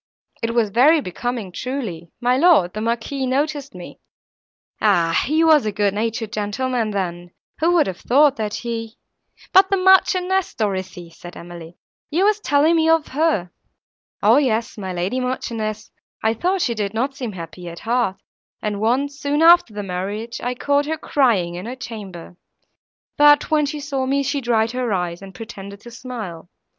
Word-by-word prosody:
It 230 0 -2
was 225 -4 +2
very 290 +9 +5
becoming 235 - -4
truly;—my 245 -1 -3
lord, 280 - +4
the 215 - -4
Marquis, 235 +4 -2
noticed 285 -1 -2
me. 175 -1 -10 0.8
Ah! 170 -6 +3
he 310 +3 +2
was 315 -3 +5
a - - 0
good 205 -1 0
natured 225 +1 -3
gentleman 225 +2 -1
then—who 185 - -3
would 345 -4 +4
have 185 -2 -5
thought 285 +3 +4
that 210 -2 -3
he—" 230 -1 -5 0.6
"But 380 0 +6
the 390 - +2
Marchioness, 380 0 +3
Dorothée," 185 -5 -3
said 175 +1 -11
Emily, 170 0 -10 0.3
"you 350 +6 +1
were 425 - +5
telling 300 +4 +3
me 320 0 +2
of 325 -2 +2
her." 270 - 0 0.7
"O 220 +5 +6
yes, 235 -5 0
my 190 -3 -5
lady 180 +8 -2
Marchioness, 225 -4 -4 0.3
I 220 0 +2
thought 365 - 0
she 235 - 0
did 210 -1 -3
not 265 +4 -1
seem 245 -6 -5
happy 175 0 -8
at 170 - -10
heart, 230 -4 0 0.4
and 210 -1 -3
once, 275 +6 0
soon 290 +2 0
after 340 -7 +6
the 205 0 -5
marriage, 200 +5 -5
I 250 +1 -2
caught 285 +3 +1
her 320 +1 -2
crying 230 - +1
in 180 +5 -6
her 250 - -5
chamber; 200 -8 -9 0.8
but, 295 0 +5
when 300 -2 +3
she 300 +1 -4
saw 275 -2 -3
me, 280 +1 +1
she 280 +1 -1
dried 230 -2 +1
her 250 -3 -2
eyes, 175 -1 -2
and 190 -1 -11
pretended 200 -2 -9
to 240 - -12
smile. 215 -10 -8
235 Hz, 170 wpm, -21 LUFS, 200-285 Hz, 0.8 s, But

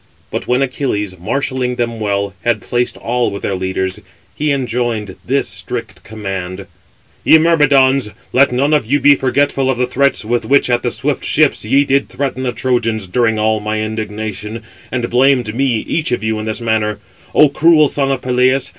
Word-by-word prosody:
But - - -4
when 125 +2 +2
Achilles, 105 -8 -3
marshalling 130 +4 -2
them 115 -2 -2
well, 100 -2 -1
had 120 -2 +1
placed 120 0 -1
all 120 0 -1
with 100 0 -7
their - - -1
leaders, 95 0 -2 0.3
he 150 0 -1
enjoined 120 -6 -2
this 135 +2 0
strict 115 -5 -6
command: 95 -3 -6 0.6
"Ye 160 - +7
Myrmidons, 140 -6 +3 0.2
let 135 +1 +4
none 140 +5 +1
of 150 -7 +1
you 145 +4 +2
be 145 +1 +6
forgetful 135 0 +1
of 130 - 0
the 125 - +1
threats 135 -1 +1
with 120 +1 0
which, 135 +2 +2
at 120 - +2
the - - -1
swift - - -2
ships, - - +2
ye 135 +6 +3
did 140 0 +1
threaten 135 -1 -3
the 130 -1 -1
Trojans, 115 -3 -1
during 110 +3 +1
all 110 0 +1
my 110 +1 -2
indignation, 110 0 -4 0.3
and 120 -2 -1
blamed 125 -2 +3
me, 125 -3 0
each 160 -5 -1
of 120 - -1
you 110 0 -1
[in 110 - -5
this 110 +2 -3
manner]: 110 -2 0 0.4
'O 150 - +6
cruel 155 +1 +4
son 140 -1 0
of 135 -2 -2
Peleus! 130 +1 +2
120 Hz, 180 wpm, -16 LUFS, 110-135 Hz, 0.6 s, Ye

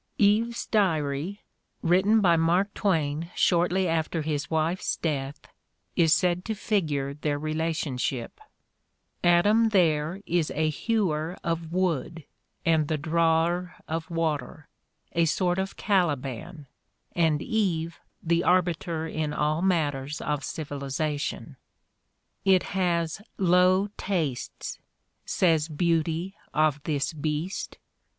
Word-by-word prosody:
"Eve's 220 +3 +2
Diary," 165 -2 0 0.4
written 190 +6 +4
by 175 -4 +5
Mark 175 +5 +2
Twain 165 -4 0
shortly 180 +1 +2
after 165 0 -1
his 145 -2 -2
wife's 160 +3 0
death, 140 -3 -3 0.5
is 165 -2 +4
said 180 +1 +3
to 220 - -2
figure 155 -10 -1
their 150 0 -2
relationship: 155 - -2 0.8
Adam 205 +6 +4
there 165 -3 +2
is 170 -2 +1
the 155 +1 0
hewer 175 -4 -1
of 165 -1 -2
wood 170 -3 -1 0.4
and 160 -2 +3
the 155 - 0
drawer 165 +3 +1
of 165 +2 -3
water, 160 -3 -2 0.4
a 170 0 +2
sort 180 +3 +1
of 190 0 -3
Caliban, 150 - -1 0.5
and 160 -3 +2
Eve 170 -7 -1 0.2
the 170 +1 +2
arbiter 170 -2 +1
in 155 -2 -2
all 150 +2 0
mat 170 -6 +2
ters 135 +3 -5
of 150 -2 -2
civilization. 145 0 -3 0.9
"It 190 -2 +4
has 175 -2 0 0.2
low 185 +1 +4
tastes," 160 -10 -3 0.5
says 160 -4 +2
Beauty 165 +3 0 0.2
of 150 -2 +2
this 145 0 -1
Beast. 155 +4 -3
165 Hz, 110 wpm, -27 LUFS, 150-180 Hz, 0.9 s, by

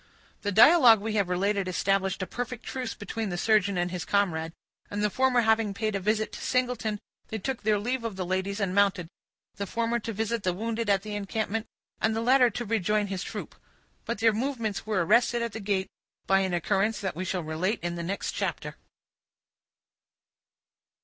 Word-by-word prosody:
The 205 - -1
dialogue 235 - +7
we 215 +2 -3
have 200 -4 +1
related 195 +2 0
established 190 +1 0
a - - -2
perfect 245 +3 -5
truce 255 -3 -4
between 210 +1 -4
the 175 - -3
surgeon 205 -1 +2
and 175 0 0
his 180 -1 -3
comrade; 170 -5 0 0.4
and 205 0 -2
the 210 - +2
former 260 0 +3
having 220 -2 +2
paid 215 0 -1
a - - 0
visit 215 +3 0
to - - -8
Singleton, 250 -4 0 0.3
they 220 - -4
took 250 +4 -3
their 215 0 +2
leave 245 +4 -2
of 225 -4 -4
the 185 -1 -3
ladies, 190 +3 -2
and 195 -3 -1
mounted; 200 -3 +2 0.5
the 200 0 -3
former 235 +2 0
to 230 - -5
visit 225 +2 -2
the 185 -2 0
wounded 225 +3 -2
at 195 -1 +3
the 215 -1 -6
encampment, 215 +2 -2 0.3
and 220 0 +2
the 225 - -1
latter 250 +1 +5
to 240 - -5
rejoin 210 -1 +1
his 190 -2 -3
troop. - - -6 0.5
But 235 - -2
their 225 +1 +3
movements 225 -3 -2
were 190 -5 +1
arrested 235 +3 +3
at 235 - -3
the 220 - -6
gate 195 -2 -1 0.3
by 195 0 +4
an 190 -2 0
occurrence 200 +5 +1
that 190 -5 -3
we 185 - -3
shall 185 -1 -2
relate 170 +8 -1
in 175 0 -2
the 170 - -4
next 190 +4 -3
chapter. - - -3
210 Hz, 195 wpm, -27 LUFS, 190-225 Hz, 0.5 s, dialogue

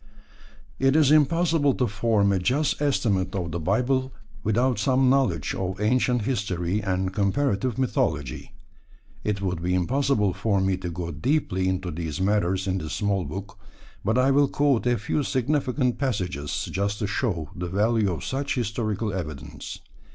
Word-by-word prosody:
It 135 +1 +3
is 150 -3 +5
impossible 155 -1 +3
to 125 - +1
form 110 -2 +2
a 95 - +2
just 135 +11 0
estimate 110 -11 +1
of 85 -3 -2
the 85 - -3
Bible 125 - +1 0.3
without 120 +3 +1
some 130 +3 +3
knowledge 105 - +1
of 95 +1 -3
ancient 125 +2 +2
history 100 -5 -1
and 95 -2 -1
comparative 110 +3 0
mythology. 75 - -1 0.7
It 100 -2 -1
would 90 -3 -2
be 90 +1 0
impossible 105 0 +1
for 100 +1 0
me 95 0 +1
to 90 -2 -5
go 85 0 -4
deeply 95 - 0
into 95 -1 -2
these 80 +1 -4
matters 95 -1 +1
in 95 -1 0
this 80 -2 -5
small 100 -3 0
book, 100 +1 -7 0.4
but 110 +4 +1
I 130 +2 +4
will 140 +1 +4
quote 140 -4 +1
a 120 0 +3
few 110 +8 -1
significant 130 -1 0
passages 90 - -2
just 100 +1 -1
to 105 - -2
show 95 - -2
the 90 -1 -4
value 105 +1 +2
of 85 - -5
such 140 +2 -2
historical 110 -2 -2
evidence. 75 -8 -6
105 Hz, 160 wpm, -25 LUFS, 95-130 Hz, 0.7 s, is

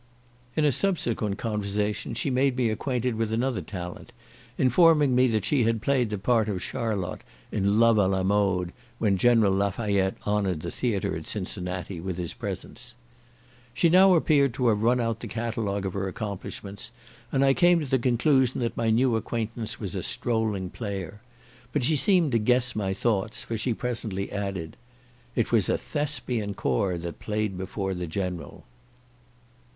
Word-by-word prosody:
In 155 - +2
a 145 - +4
subsequent 120 - 0
conversation 105 -1 -2
she 140 - -1
made 130 0 +2
me 120 -3 +2
acquainted 125 0 -1
with 110 -1 -1
another 115 -2 0
talent, 90 0 -7 0.5
informing 145 +1 +5
me 130 +1 +5
that 110 -4 0
she 140 -5 +2
had 115 0 +1
played 130 -4 +2
the 105 - -2
part 110 +2 +2
of 95 -3 -3
Charlotte, 110 -8 -3 0.3
in 100 0 +1
Love 115 -1 +5
à 95 -2 +3
la 95 -1 0
mode, 95 -3 +1 0.2
when 100 -2 +2
General 110 -1 +4
Lafayette 100 0 0
honoured 100 -6 0
the 85 - -5
theatre 105 -9 -1
at 80 0 -7
Cincinnati 90 -2 -4
with 90 0 -4
his 85 -2 -4
presence. 120 -1 -6 0.8
She 170 - +4
now 185 +2 +7
appeared 140 -6 +3
to 125 -2 +2
have 105 -2 +1
run 120 +2 +3
out 115 -1 -1
the 120 - -6
catalogue 110 -3 -2
of 95 - -3
her 95 -1 -2
accomplishments; 100 0 -6 0.4
and 135 0 +3
I 135 - +5
came 175 +2 +4
to 155 - -3
the 130 -1 +1
conclusion 130 +1 +2
that 115 - -1
my 115 -1 0
new 120 +2 +3
acquaintance 115 0 -3
was 100 -5 -5
a - - -2
strolling 100 - -1
player: 100 -3 -5 0.5
but 125 - 0
she 155 +5 +3
seemed 175 -1 +3
to 115 - +3
guess 125 +2 +2
my 100 -3 -1
thoughts, 110 +1 -1
for 115 - -4
she 115 +2 -1
presently 110 -6 -3
added. 100 -5 -4 0.6
"It 115 - 0
was 110 -6 +3
a - - +2
Thespian 125 -9 -2
corps 95 -3 0
that 85 0 -6
played 105 -2 -2
before 95 +1 -3
the 90 -1 -4
General." 90 -3 -4
110 Hz, 170 wpm, -26 LUFS, 95-125 Hz, 0.8 s, now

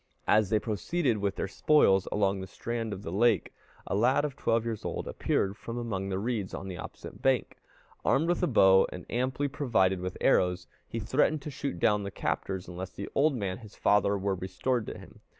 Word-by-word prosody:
As 105 -2 +4
they 110 - +3
proceeded 115 - -1
with 100 -1 -1
their - - -2
spoils 95 -4 +3
along 100 -2 +1
the 95 - -6
strand 115 +2 -4
of 100 0 -6
the 80 - -5
lake, 110 +3 +2 0.3
a - - -3
lad 125 +8 +3
of 140 -3 -4
twelve 115 -4 +1
years 115 -2 -3
old - - -4
appeared 95 0 0
from 115 +2 -7
among 100 -5 -3
the 95 - -1
reeds 105 -2 -2
on 95 - -6
the 90 -2 -6
opposite - - -9
bank, 130 -5 +1 0.4
armed 150 +5 +2
with 175 - +1
a 180 - +2
bow, 95 - +6
and 90 - -8
amply 130 +4 0
provided 115 -10 +1
with 90 0 -5
arrows; 90 0 +2 0.2
he - - -5
threatened 145 +5 +1
to 150 - -5
shoot 140 0 -4
down 105 -1 +3
the 100 - -4
captors 95 -1 -3
unless 90 +1 -6
the 100 +2 -7
old 145 0 +3
man, 95 -5 -3
his 110 -4 -13
father, 100 0 +3
were 100 0 -1
restored 95 +6 -2
to - - -6
him. - - -14
105 Hz, 205 wpm, -29 LUFS, 95-125 Hz, 0.4 s, bow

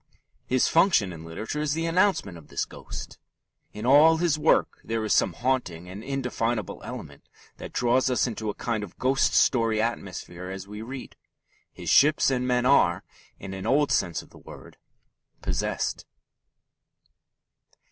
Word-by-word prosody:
His 130 0 +2
function 160 - +3
in 80 -1 -10
literature 105 - -5
is 150 -1 0
the 165 0 -1
announcement 175 - +1
of 80 -3 -13
this - - -2
ghost. - - -9 0.5
In 105 +2 -7
all 150 +5 +6
his 165 -2 +2
work 155 - +2
there 115 -1 -2
is 110 - +2
some - - +3
haunting 120 -10 -2
and 95 +4 -8
indefinable 120 -5 -2
element - - -9 0.3
that - - -8
draws 125 +2 +2
us 125 - +2
into 110 -3 -4
a 105 - -4
kind 115 -3 -2
of 95 - -10
ghost 135 +1 +2
story 115 -4 +3
atmosphere 90 -5 -4
as 95 0 -7
we 105 +1 -8
read. 130 +3 -8 0.6
His - - -4
ships 150 -1 +5
and 125 -1 0
men 125 0 +1
are, 125 -10 +4 0.3
in 95 - -8
an 95 0 -5
old 140 +1 +3
sense 85 - 0
of - - -21
the - - -15
word, - - -13 0.7
possessed. - - -2
120 Hz, 155 wpm, -26 LUFS, 100-135 Hz, 0.7 s, all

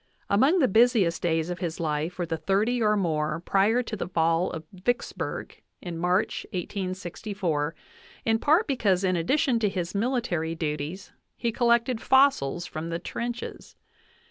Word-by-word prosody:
Among 270 - +4
the 280 -7 +4
busiest 220 -5 +3
days 165 0 0
of 175 - -5
his 170 -2 -3
life 155 +1 -2
were 175 - -1
the 165 0 -2
thirty 200 +9 +1
or 210 -1 +3
more 155 -4 0
prior 210 +7 +2
to 230 - -5
the 195 - -4
fall 165 0 +2
of 160 -2 -6
Vicksburg, 235 +6 -3 0.2
in 175 -3 -6
March, 180 +3 +1
1864, 185 -3 -3 0.5
in 225 0 +2
part 315 - +4
because 205 - +1
in 185 -1 +2
addition 240 - +2
to 210 -2 +2
his 180 -2 -3
military 200 -8 -1
duties 155 +3 -4 0.2
he 235 - -1
collected 235 0 +2
fossils 220 - +3
from 165 -1 -5
the 165 - -2
trenches. 235 +7 -6
185 Hz, 150 wpm, -26 LUFS, 165-230 Hz, 0.5 s, Among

